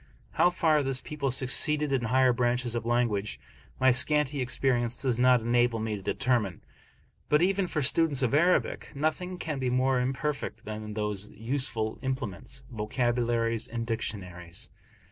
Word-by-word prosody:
How 175 - +4
far 160 -4 +2
this 135 -2 0
people 145 -2 -3
succeed 130 +4 +2
in 135 -5 0
higher 130 +2 +3
branches 120 0 0
of 115 -1 -3
language, 115 -4 0 0.4
my 130 0 +5
scanty 145 +2 +2
experience 125 -2 0
does 125 -3 0
not 125 -1 +5
enable 120 0 +2
me 110 -1 -2
to 100 - -7
determine. 115 -5 0 0.7
But 150 +3 +4
even 195 0 +1
for 155 -3 -1
students 145 0 +2
of 130 - +1
Arabic, 170 +2 +1
nothing 170 +5 -2
can 155 -5 -4
be 130 -1 0
more 130 +1 +2
imperfect 135 +3 -3
than 105 0 -6
those 105 -1 -3
useful 115 -2 -3
implements, 130 -1 -4
Vocabularies 115 0 0
and 115 0 -4
Dictionaries. 90 -6 -4
125 Hz, 145 wpm, -28 LUFS, 115-140 Hz, 0.7 s, my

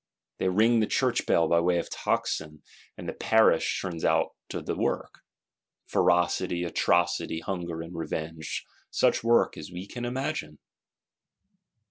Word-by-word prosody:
They 95 - +1
ring 110 +5 +4
the 110 - +2
Church 125 -2 +1
bell 85 - +4
by 85 - +4
way 90 +1 +2
of 85 - -2
tocsin: 75 -1 -2 0.3
and - - -8
the - - -3
Parish 110 0 +3
turns 85 -3 -5
out - - +3 0.2
to - - -3
the - - -3
work. - - -2 0.7
Ferocity, 90 0 +2
atrocity; 80 -1 +1
hunger 85 -2 -4
and 85 +1 -9
revenge: 80 -1 -4 0.2
such - - +2
work 115 0 +3
as 80 +3 -9
we 90 +2 -6
can 120 +4 -7
imagine! 120 - -3
90 Hz, 140 wpm, -27 LUFS, 80-110 Hz, 0.7 s, ring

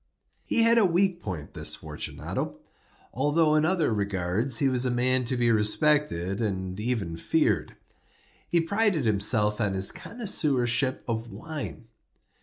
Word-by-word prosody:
He 230 - +3
had 230 0 +5
a - - +4
weak 180 0 +1
point—this 85 - -4
Fortunato—although 150 +4 -3
in 155 0 +3
other 165 -8 +1
regards 100 +4 -1
he 140 - +2
was 130 -2 +1
a 130 - +1
man 125 +1 +1
to 125 +2 -2
be 120 -1 +3
respected 105 - +1
and 95 -3 -3
even 105 -8 -2
feared. - - 0 0.7
He 170 - +3
prided 200 - +1
himself 105 +1 +2
on 100 -3 0
his 95 0 +2
connoisseurship 135 - -1
in 115 0 -3
wine. 130 +1 -7
125 Hz, 130 wpm, -27 LUFS, 105-155 Hz, 0.7 s, had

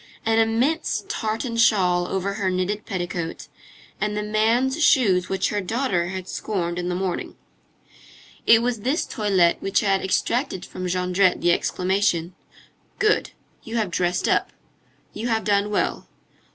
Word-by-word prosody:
an 225 0 +3
immense 240 +9 +1
tartan 225 +2 -3
shawl 180 -6 +3
over 195 +1 -2
her 200 -2 -1
knitted 185 +3 -2
petticoat, 175 -3 -4 0.5
and 210 0 -1
the 210 - -1
man's 235 +8 +1
shoes 195 -12 +3
which 190 -1 0
her 205 -1 -1
daughter 200 -4 -1
had 185 0 -6
scorned 175 -5 -3
in 175 0 -2
the 180 - -1
morning. 185 -1 -3 1.1
It 230 0 +6
was 245 -2 -1
this 265 - 0
toilette 195 -7 +1
which 195 0 +1
had 195 -3 +1
extracted 190 0 -1
from 185 0 -6
Jondrette 180 +1 +1
the 175 - +3
exclamation: 185 -1 0 0.6
"Good! 425 0 +2 0.3
You 225 - -7
have 215 -6 0
dressed 175 0 0
up. - - +1 0.6
You 225 +3 -4
have 225 -2 0
done 205 0 +1
well. 210 - -1
200 Hz, 145 wpm, -23 LUFS, 180-225 Hz, 1.1 s, It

